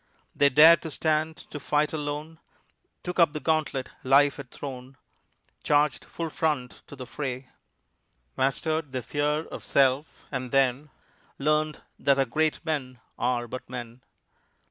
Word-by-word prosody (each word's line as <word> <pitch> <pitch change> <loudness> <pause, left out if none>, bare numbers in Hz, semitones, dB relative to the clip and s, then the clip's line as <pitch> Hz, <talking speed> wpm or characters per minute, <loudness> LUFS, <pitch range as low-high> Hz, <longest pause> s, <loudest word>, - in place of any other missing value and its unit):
They 145 - +5
dared 155 +4 +8
to 160 - -5
stand 155 +1 0
to 150 - -5
fight 150 +2 0
alone, 150 +1 -4 0.6
Took 180 +1 -4
up 165 -3 +5
the 150 - -3
gauntlet 150 -3 -1
life 140 +2 +4
had 140 -3 -9
thrown, 130 -1 -8 0.7
Charged 145 -1 +2
full 165 -2 -5
front 150 -7 -2
to 150 - -10
the 130 -2 -8
fray, 130 0 -5 0.9
Mastered 145 +2 -1
their 130 -2 -3
fear 150 +4 -1
of - - -9
self, 135 +2 +1
and 130 -2 -3
then 135 +2 +2 0.5
Learned 155 +1 0 0.2
that 140 -1 +3
our 135 - +3
great 155 +6 -1
men 130 -6 -3 0.2
are 120 -1 0
but 130 +1 -8
men. 120 -1 -7
145 Hz, 145 wpm, -27 LUFS, 130-155 Hz, 0.9 s, dared